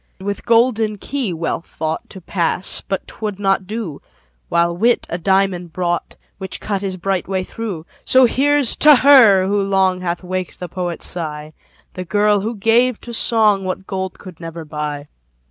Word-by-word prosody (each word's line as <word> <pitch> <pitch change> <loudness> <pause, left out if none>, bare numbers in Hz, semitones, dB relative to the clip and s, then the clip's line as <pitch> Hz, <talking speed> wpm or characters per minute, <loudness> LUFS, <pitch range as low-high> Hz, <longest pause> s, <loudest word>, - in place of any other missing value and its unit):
With 200 +1 -5
golden 230 -2 +2
key 260 -1 -3
Wealth 165 0 -3
thought 160 0 -4
To 190 - -10
pass 175 0 0
but 195 -1 -4
'twould 210 -3 -5
not 195 -2 +1
do: 210 -9 -5 0.5
While 170 0 +2
Wit 230 +6 +2
a 170 - -2
diamond 190 -2 0
brought, 175 -1 -2 0.2
Which 190 -1 -4
cut 200 -2 -3
his 190 -2 -3
bright 190 0 -2
way 190 -1 -1
through. 195 -6 -6 0.2
So 260 0 +5
here's 280 +1 +2
to 300 -1 +7
her, 245 -9 +6
who 200 +1 +1
long 190 -2 +1
Hath 175 0 -3
waked 185 0 -4
the 180 - -5
poet's 175 -1 -4
sigh, 155 -3 -4 0.4
The 185 - -5
girl, 205 +2 +2
who 220 +4 -3
gave 225 +3 +2
to 240 - -9
song 215 -4 +3
What 185 +1 -4
gold 190 -1 -4
could 180 -4 -12
never 165 -1 -7
buy. 150 -1 -5
190 Hz, 170 wpm, -19 LUFS, 175-215 Hz, 0.5 s, to